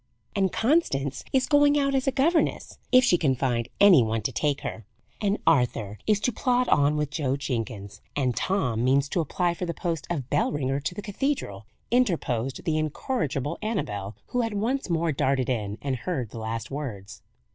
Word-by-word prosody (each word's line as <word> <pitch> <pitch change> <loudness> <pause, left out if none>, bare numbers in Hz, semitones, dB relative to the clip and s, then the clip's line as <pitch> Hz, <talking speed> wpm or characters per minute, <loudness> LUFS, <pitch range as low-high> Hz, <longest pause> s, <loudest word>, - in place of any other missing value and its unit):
"And 195 -2 +2
Constance 140 - +1
is 265 -1 +3
going 290 0 +4
out 275 -1 +1
as 270 0 0
a - - +4
governess, 305 +6 +1
if 255 0 +7
she 180 -8 +4
can 135 -5 +2
find 120 -3 -1
any 195 -9 +8
one 110 -1 -1
to - - -1
take 145 -2 0
her, 110 - -5 0.4
and 205 0 +1
Arthur 110 -5 +1
is 210 -2 +3
to 245 - +1
plod 250 +2 +1
on 145 +1 +4
with 150 -1 -1
Joe 140 -3 -1
Jenkins, 115 -7 -4
and 130 -4 0
Tom 125 - 0
means 135 +2 +3
to 175 - +1
apply 175 +3 0
for 180 +1 -4
the 170 - -3
post 165 -4 -3
of 145 -8 -2
bell 145 - +2
ringer 135 -1 -1
to 160 +5 -4
the 205 - -6
cathedral," 205 - -3 0.2
interposed 145 - 0
the 155 -2 0
incorrigible 155 - -2
Annabel, 105 - -3
who 245 - 0
had 225 -3 -2
once 235 +4 -1
more 165 -1 +1
darted 135 -3 0
in, 105 -4 -2
and 135 -2 -1
heard 125 - -3
the 115 - -7
last 110 +2 -4
words. 110 -9 -6
145 Hz, 190 wpm, -26 LUFS, 125-205 Hz, 0.4 s, any